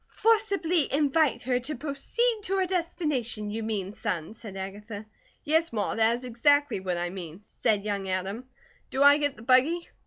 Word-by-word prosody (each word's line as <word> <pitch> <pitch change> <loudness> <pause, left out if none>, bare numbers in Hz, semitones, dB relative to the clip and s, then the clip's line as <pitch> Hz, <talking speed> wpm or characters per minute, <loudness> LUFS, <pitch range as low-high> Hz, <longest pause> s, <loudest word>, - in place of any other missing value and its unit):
"'Forcibly 395 - +1
invite 290 +1 +2
her 250 0 +1
to 270 +5 -3
proceed 425 - -1
to 390 -1 -1
her 380 - +2
destination,' 300 - -2
you 225 +2 -3
mean, 205 -3 -3
son," 170 -2 -4
said 215 -4 -10
Agatha. 205 +2 -7 0.4
"Yes, 320 +2 +2
Ma, 210 -3 -1
that 225 +1 +3
is 245 - -7
exactly 285 +2 +3
what 185 -2 -2
I 175 0 -2
mean," 180 -1 -8
said 210 -1 0
young 200 -2 -2
Adam. 195 +7 -3 0.4
"Do 265 +1 +1
I 285 +1 +7
get 290 -1 0
the 220 - -13
buggy?" 270 +8 +3
250 Hz, 175 wpm, -27 LUFS, 205-305 Hz, 0.4 s, I